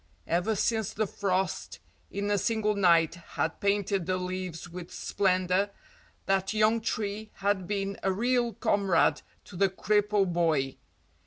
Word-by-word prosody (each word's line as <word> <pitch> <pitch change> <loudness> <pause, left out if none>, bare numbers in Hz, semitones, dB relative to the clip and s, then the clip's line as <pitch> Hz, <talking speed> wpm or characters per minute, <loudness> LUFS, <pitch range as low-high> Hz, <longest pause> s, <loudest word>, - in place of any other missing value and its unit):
Ever 180 +6 +1
since 220 0 0
the 215 - 0
frost 190 -2 -2 0.3
in 200 +1 -2
a 205 - +3
single 220 0 +1
night 170 -5 +4 0.2
had 165 - -1
painted 200 -2 0
the 185 0 +1
leaves 180 -2 -4
with 175 0 -8
splendour, 185 0 +1 0.6
that 195 +1 +1
young 215 +1 +3
tree 215 -1 -3
had 195 -2 0
been 200 -1 -2
a 195 - +1
real 240 +3 +1
comrade 200 -2 +2 0.2
to 185 - -12
the 195 +2 +3
cripple 205 +1 +2
boy. 160 -7 0
195 Hz, 140 wpm, -28 LUFS, 180-210 Hz, 0.6 s, night